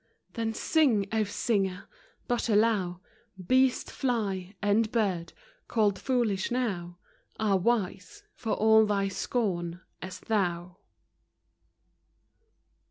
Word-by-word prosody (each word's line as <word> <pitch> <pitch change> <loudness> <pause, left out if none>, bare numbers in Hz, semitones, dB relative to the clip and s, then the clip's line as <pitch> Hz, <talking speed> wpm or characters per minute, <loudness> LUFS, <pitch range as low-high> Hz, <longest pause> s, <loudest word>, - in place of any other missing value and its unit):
Then 225 -2 -2
sing, 245 -12 +2
O 220 -1 +2
singer! 195 -2 -1 0.2
— - - -36
but 240 -1 -1
allow 205 -5 +2 0.4
Beast, 260 +3 +2
fly, 200 -7 -2
and 210 +2 +2
bird, 190 -7 0 0.4
called 210 -4 +1
foolish 230 -7 0
now, 190 -9 -2 0.4
Are 210 -3 +2
wise 185 -4 -1
(for 225 -3 -3
all 220 0 +5
thy 200 -1 +1
scorn) 180 -5 -2 0.2
as 185 +2 -7
thou 180 -4 -1
205 Hz, 100 wpm, -28 LUFS, 185-230 Hz, 0.4 s, all